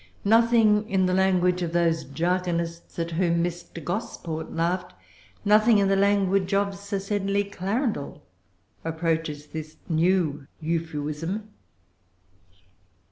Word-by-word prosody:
Nothing 225 -1 +4
in 190 -1 +2
the 185 - +1
language 180 -1 +2
of 170 -1 -2
those 165 -2 +2
jargonists 170 +2 -2
at 170 0 -2
whom 170 0 +1
Mr. 175 -1 -5
Gosport 175 -4 -4
laughed, 175 +2 -1 0.5
nothing 215 +2 +5
in 200 -1 +3
the 195 - +3
language 195 -1 +2
of 200 0 +1
Sir 200 +1 -4
Sedley 200 0 0
Clarendel, 200 - -2 0.6
approaches 160 -2 -2
this 155 0 -8
new 160 -4 +1
Euphuism. 165 +5 -3
180 Hz, 110 wpm, -25 LUFS, 165-200 Hz, 0.6 s, nothing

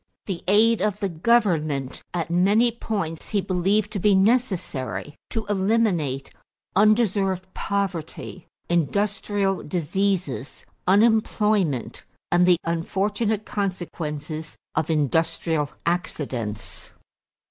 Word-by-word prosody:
The 180 -4 -4
aid 220 +2 +4
of 210 0 0
the 200 - -1
government 160 - +1
at 170 -1 -3
many 205 +7 +4
points 200 -8 -4
he 210 - +1
believed 195 +3 +1
to 205 - -3
be 205 +1 +4
necessary 190 - 0 0.2
to 225 -3 -3
eliminate 190 - +1 0.4
undeserved 200 -3 +3
poverty, 185 -3 -3 0.2
industrial 195 +3 0
diseases, 180 -2 -2 0.2
unemployment, 210 - +2 0.3
and 175 +1 +4
the 180 -1 +6
unfortunate 205 +6 -1
consequences 160 -5 -4 0.2
of 160 - -1
industrial 155 0 +1 0.2
accidents. 130 - -3
190 Hz, 95 wpm, -24 LUFS, 160-210 Hz, 0.4 s, the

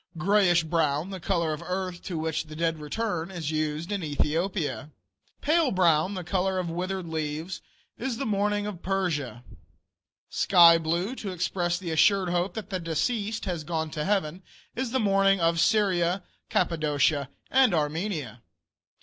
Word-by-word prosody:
Grayish 175 -2 +3
brown, 160 +1 0
the 190 - -5
color 170 -3 0
of 150 - -5
the - - -10
earth 185 -1 -3
to 175 - -4
which 160 0 -2
the 155 0 -10
dead 165 0 -1
return, 170 +2 -3
is 170 -5 -4
used 155 +3 -2
in 200 -3 -2
Ethiopia. 155 +1 -1 0.5
Pale 315 -1 +3
brown, 180 +1 +3
the 185 - -4
color 190 +2 0
of 175 -2 -2
withered 185 +2 -3
leaves, 160 +2 -4 0.4
is 245 -1 -2
the 275 - -3
mourning 205 0 0
of 200 -4 -6
Persia. 155 - -2 0.8
Sky 170 -3 +6
blue, 170 +7 -1
to 215 -6 -6
express 175 -1 -1
the 175 -2 -5
assured 185 +4 +3
hope 175 +2 -1
that 215 -2 -6
the 185 - -1
deceased 205 +7 -2
has 175 -5 -3
gone 160 0 -3
to 150 - -3
heaven, 185 -2 -1 0.3
is 255 0 -2
the 260 +2 0
mourning 195 -2 +3
of 165 0 +2
Syria, 185 -3 +2 0.3
Cappadocia, 150 -4 +1 0.2
and 260 -3 +5
Armenia. 155 - -2
175 Hz, 160 wpm, -27 LUFS, 160-195 Hz, 0.8 s, Sky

